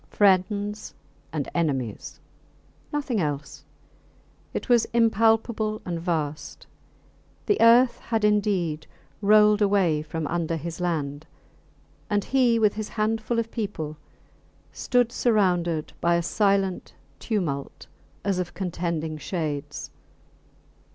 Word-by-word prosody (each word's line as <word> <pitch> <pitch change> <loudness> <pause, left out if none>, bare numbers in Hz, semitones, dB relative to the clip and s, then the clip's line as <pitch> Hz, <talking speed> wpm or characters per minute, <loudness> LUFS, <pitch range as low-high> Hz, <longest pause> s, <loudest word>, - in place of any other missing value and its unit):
Friends 205 +1 +1 0.4
and 150 -2 -3
enemies 135 -10 -2 0.7
nothing 280 -7 -1
else. 145 -2 -4 0.9
It - - -4
was 240 -3 +4
impalpable 225 -1 +2
and 170 -2 -3
vast. 155 -4 -3 0.8
The 415 - +1
earth 235 +2 +6
had 225 -2 -1
indeed 190 -7 +1 0.3
rolled 210 +1 +5
away 195 -7 +3
from 160 +1 -4
under 165 +1 -1
his 165 +1 -6
land, 150 -4 -2 0.8
and 205 -1 +1
he, 250 -2 +3
with 215 -2 +3
his 215 0 -5
handful 220 +2 -1
of 230 0 -1
people, 180 -9 -4 0.8
stood 245 -2 +1
surrounded 180 -10 +1
by 170 0 +3
a 170 - 0
silent 195 0 0 0.2
tumult 155 -11 -3 0.4
as 195 -2 0
of 180 -2 -4
contending 170 -4 -3
shades. 150 -4 -4
195 Hz, 105 wpm, -25 LUFS, 160-215 Hz, 0.9 s, earth